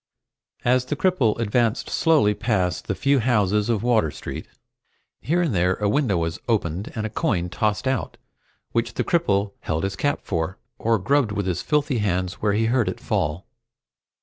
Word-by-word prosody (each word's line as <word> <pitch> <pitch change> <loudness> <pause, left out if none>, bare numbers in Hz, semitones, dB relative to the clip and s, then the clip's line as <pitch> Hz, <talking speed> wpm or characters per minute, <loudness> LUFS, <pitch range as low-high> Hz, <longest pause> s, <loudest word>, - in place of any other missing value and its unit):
As 125 +1 +3
the 150 - -2
cripple 145 - +2
advanced 115 0 +1
slowly 150 -11 +3
past 95 -6 -1
the - - -1
few 140 0 +2
houses 105 -3 +2
of 110 -3 0
Water 115 -9 +3
Street, - - -7 0.7
here 175 +4 +1
and 155 -8 0
there 90 0 +2
a 105 - -1
window 105 -4 +2
was 80 -1 -2
opened 100 -5 -1
and 110 - -2
a - - -2
coin 90 -5 0
tossed 105 +6 -1
out, 130 0 -1 0.5
which 115 0 -1
the - - 0
cripple 100 - +1
held 80 +2 -2
his 95 0 -2
cap 145 0 0
for, 85 0 -2 0.2
or 115 0 +2
grubbed 135 +3 +1
with 100 -1 -2
his 90 -3 -1
filthy 145 -4 +1
hands 90 -2 -1
where 105 -1 +2
he 110 +2 +2
heard 120 0 +2
it - - -5
fall. 75 +5 -1
105 Hz, 175 wpm, -23 LUFS, 95-125 Hz, 0.7 s, As